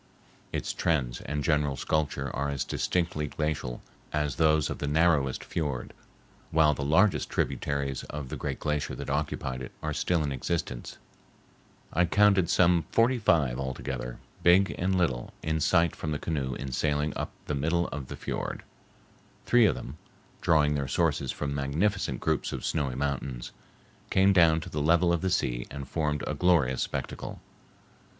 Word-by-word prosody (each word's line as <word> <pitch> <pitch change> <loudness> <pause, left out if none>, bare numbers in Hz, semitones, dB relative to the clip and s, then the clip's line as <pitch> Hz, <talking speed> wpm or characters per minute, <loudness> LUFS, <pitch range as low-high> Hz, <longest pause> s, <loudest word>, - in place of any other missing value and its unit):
Its - - -2
trends 65 -8 0
and 75 0 -2
general 75 -2 +1
sculpture 70 -3 -1
are 70 +1 -1
as 70 -2 -1
distinctly 85 -4 -1
glacial 75 -5 -3 0.3
as 75 -3 -1
those 80 -2 +3
of - - -5
the 75 - -2
narrowest 75 -3 +2
fiord, 70 -7 -3 0.6
while 80 -1 +4
the 70 - -4
largest 80 +8 +3
tributaries 70 -2 -1
of 75 -3 -6
the - - -4
great - - -4
glacier 75 -1 -1
that - - -5
occupied 70 -3 -2
it 65 - -7
are - - -1
still 85 -3 +1
in 70 - -1
existence. 65 -2 -3 1.0
I 85 +3 +3
counted 100 -1 +4
some 85 -3 +4
forty 120 +2 +3
five 70 - +2
altogether, 65 -2 -4 0.2
big 95 +3 +5
and 95 +1 0
little, 65 -10 -1
in 80 0 0
sight 85 +1 +3
from 80 - -4
the 75 - -1
canoe 70 -5 -2
in 70 +1 -5
sailing 75 +2 0
up - - -3 0.2
the - - -2
middle 80 +5 +1
of 70 -3 -6
the - - -7
fiord. - - -4 0.8
Three 120 -3 +5
of - - +1
them, 70 +6 -8 0.4
drawing 75 -2 +3
their 70 -2 -1
sources 70 -3 +1
from 70 -1 -3
magnificent 70 +9 0
groups - - 0
of - - -4
snowy 70 -6 -1
mountains, 70 -2 -3 0.6
came 95 +1 +4
down 80 -3 +5
to - - -8
the 75 - -2
level 85 +3 +4
of 85 - 0
the 95 - 0
sea - - 0
and 70 -1 -7
formed 75 -3 -1
a - - -2
glorious 80 -8 +3
spectacle. - - -4
75 Hz, 165 wpm, -28 LUFS, 70-85 Hz, 1.0 s, big